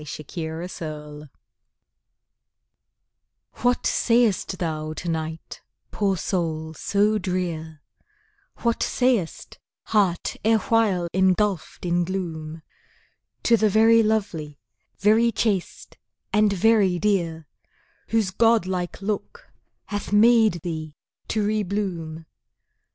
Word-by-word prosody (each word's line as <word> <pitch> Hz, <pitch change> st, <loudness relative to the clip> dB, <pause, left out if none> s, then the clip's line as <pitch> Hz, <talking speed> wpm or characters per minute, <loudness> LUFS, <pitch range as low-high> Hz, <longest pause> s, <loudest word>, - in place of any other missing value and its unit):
Sonnet 150 Hz, 0 st, -8 dB, 0.4 s
XLIII 150 Hz, -2 st, -8 dB, 2.3 s
What 245 Hz, 0 st, +1 dB
sayest 230 Hz, -5 st, +2 dB
thou, 155 Hz, -2 st, -3 dB
to 165 Hz, -, -7 dB
night, 160 Hz, -1 st, -4 dB, 0.3 s
poor 195 Hz, -2 st, 0 dB
soul 160 Hz, -3 st, -2 dB
so 205 Hz, +5 st, +1 dB
drear, 165 Hz, -5 st, -4 dB, 0.8 s
What 235 Hz, -1 st, +1 dB
sayest 245 Hz, -10 st, 0 dB, 0.2 s
heart 195 Hz, -6 st, 0 dB
erewhile 220 Hz, -4 st, +2 dB
engulfed 190 Hz, -1 st, +1 dB
in 175 Hz, 0 st, +1 dB
gloom, 165 Hz, -4 st, -5 dB, 0.8 s
To 235 Hz, -, +5 dB
the 215 Hz, -1 st, +2 dB
very 225 Hz, +2 st, +5 dB
lovely, 195 Hz, -9 st, -1 dB, 0.4 s
very 220 Hz, +3 st, +4 dB
chaste, 200 Hz, -4 st, -2 dB, 0.3 s
and 210 Hz, -1 st, +4 dB
very 200 Hz, -2 st, +3 dB
dear, 170 Hz, -6 st, -1 dB, 0.6 s
Whose 220 Hz, -4 st, +1 dB
god 225 Hz, 0 st, +3 dB
like 185 Hz, +1 st, -4 dB
look 215 Hz, -, -4 dB, 0.3 s
hath 205 Hz, -2 st, -5 dB
made 220 Hz, -4 st, +5 dB
thee 155 Hz, -3 st, -5 dB, 0.3 s
to 215 Hz, -2 st, 0 dB
re 215 Hz, +1 st, +1 dB
bloom? 175 Hz, -5 st, -4 dB
190 Hz, 95 wpm, -24 LUFS, 165-215 Hz, 2.3 s, To